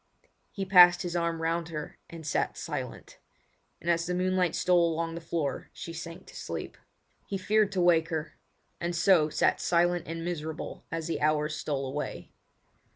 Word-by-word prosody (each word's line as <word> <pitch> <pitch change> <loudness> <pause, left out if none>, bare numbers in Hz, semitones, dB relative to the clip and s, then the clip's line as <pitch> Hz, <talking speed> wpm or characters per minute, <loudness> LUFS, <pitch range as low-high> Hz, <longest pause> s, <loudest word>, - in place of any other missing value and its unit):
He 195 - -4
passed 180 -1 +7
his 175 -1 -4
arm 170 -1 -1
round 165 0 -1
her 150 -2 -6
and 165 -2 -9
sat 150 - -1
silent; - - -6 0.6
and - - -11
as 170 -1 +2
the 180 - -1
moonlight 185 -2 +1
stole 175 -2 +3
along 165 +1 -2
the 170 - -6
floor 160 -4 -3
she 165 - -7
sank 165 +1 -8
to - - -14
sleep. - - -5 0.5
He 195 - -2
feared 210 +2 +2
to 185 - +1
wake 165 -2 +4
her; 160 -2 -4 0.4
and 170 0 -2
so 170 -3 +4
sat - - +2
silent 175 0 +2
and 165 +1 -5
miserable 160 -2 -5
as 165 -1 -3
the 165 - -2
hours 150 0 +1
stole 140 -3 -2
away. 140 +3 -5
170 Hz, 170 wpm, -29 LUFS, 160-175 Hz, 0.6 s, passed